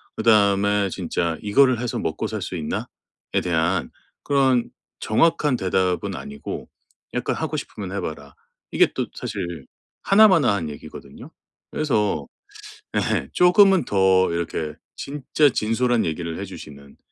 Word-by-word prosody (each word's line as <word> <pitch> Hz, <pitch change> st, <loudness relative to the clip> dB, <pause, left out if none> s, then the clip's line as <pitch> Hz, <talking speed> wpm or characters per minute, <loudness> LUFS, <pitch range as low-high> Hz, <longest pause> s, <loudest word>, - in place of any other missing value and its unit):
그다음에 100 Hz, -2 st, +3 dB
진짜 85 Hz, -2 st, -2 dB
'이거를 130 Hz, +3 st, +4 dB
해서 120 Hz, -1 st, -3 dB
먹고살 -, -, -3 dB
수 -, -, -5 dB
있나.'에 80 Hz, -3 st, -5 dB
대한 85 Hz, +1 st, 0 dB, 0.3 s
그런 135 Hz, -4 st, +2 dB, 0.3 s
정확한 150 Hz, +3 st, +2 dB
대답은 95 Hz, -3 st, -1 dB
아니고 70 Hz, 0 st, -7 dB, 0.5 s
약간 -, -, -1 dB
"하고 -, -, -3 dB
싶으면 95 Hz, -3 st, -6 dB
해 100 Hz, -, -3 dB
봐라." 70 Hz, -2 st, -7 dB, 0.4 s
이게 -, -, +4 dB
또 -, -, -1 dB
사실 85 Hz, -4 st, -6 dB, 0.3 s
하나 215 Hz, +2 st, +6 dB
마나 160 Hz, -, +3 dB
한 85 Hz, -6 st, -3 dB
얘기거든요? 75 Hz, -, -11 dB, 0.4 s
그래서 105 Hz, -, 0 dB, 0.7 s
예 70 Hz, -, 0 dB
쪼금은 185 Hz, -, +5 dB
더 95 Hz, -2 st, +3 dB
이렇게 80 Hz, -2 st, -3 dB, 0.3 s
진짜 145 Hz, +1 st, +1 dB
진솔한 120 Hz, +1 st, +1 dB
얘기를 80 Hz, 0 st, -4 dB
해 -, -, -4 dB
주시는 70 Hz, -7 st, -12 dB
100 Hz, 275 characters per minute, -22 LUFS, 85-125 Hz, 0.7 s, 하나